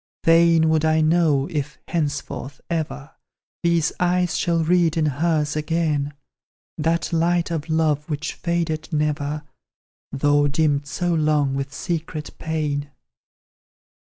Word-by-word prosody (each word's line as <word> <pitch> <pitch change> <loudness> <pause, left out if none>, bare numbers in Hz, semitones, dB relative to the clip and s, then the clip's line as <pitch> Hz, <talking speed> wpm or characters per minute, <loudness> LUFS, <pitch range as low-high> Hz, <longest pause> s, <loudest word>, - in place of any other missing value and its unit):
Fain 165 -1 +5
would 160 -1 +2
I 160 0 +3
know 155 -4 +3
if, 145 -3 -3
henceforth, 145 -3 -3
ever, 155 -3 -3 0.5
These 170 -2 +2
eyes 180 -1 +1
shall 170 -2 +1
read 170 -1 +2
in 160 - +2
hers 150 +1 0
again, 150 -2 -1 0.6
That 165 +2 -1
light 170 +1 +1
of 160 -1 -3
love 155 -1 +1
which 150 0 -3
faded 170 -2 -2
never, 150 -1 -1 0.7
Though 145 +1 +3
dimmed 145 -1 +1
so 175 +4 -1
long 150 -3 +2
with 135 0 -3
secret 155 -1 -4
pain. 150 -3 -2
155 Hz, 120 wpm, -22 LUFS, 145-165 Hz, 0.7 s, Fain